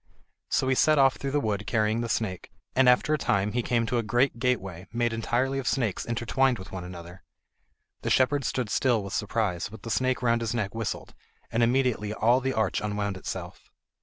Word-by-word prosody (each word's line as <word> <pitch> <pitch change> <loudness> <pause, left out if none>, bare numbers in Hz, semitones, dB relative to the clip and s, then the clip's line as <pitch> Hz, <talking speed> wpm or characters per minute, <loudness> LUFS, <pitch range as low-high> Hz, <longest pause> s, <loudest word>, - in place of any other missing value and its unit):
So 130 - +1
he 130 - +3
set 155 +4 +4
off 135 -1 +4
through 140 - -3
the 145 +2 +1
wood 105 -5 -2
carrying 110 0 +1
the 115 - -3
snake, 105 -5 -2 0.2
and 130 -1 +6
after 125 +5 +3
a 155 - +1
time 100 -3 +1
he 120 - 0
came 115 -1 +1
to 120 +1 0
a - - +2
great 120 +3 +1
gateway, 95 -8 -1
made 120 0 0
entirely 125 +4 0
of 130 - -5
snakes 115 -8 0
intertwined 120 +2 +1
one 95 - -9
with 90 - -8
another. 85 +1 -11 0.8
The - - -2
shepherd 140 +2 +3
stood 125 -5 -2
still 120 -5 +2
with 100 0 -7
surprise, 105 -5 -1
but 110 -2 -12
the 115 - -5
snake 130 +1 0
round 115 -1 +2
his 115 0 -2
neck 100 -4 -2
whistled, 115 -2 -4 0.4
and 115 - +1
immediately 120 -3 +1
all 120 +4 +3
the 135 0 0
arch 110 -4 0
unwound 105 -1 -2
itself. 95 - -7
115 Hz, 205 wpm, -27 LUFS, 105-130 Hz, 0.8 s, and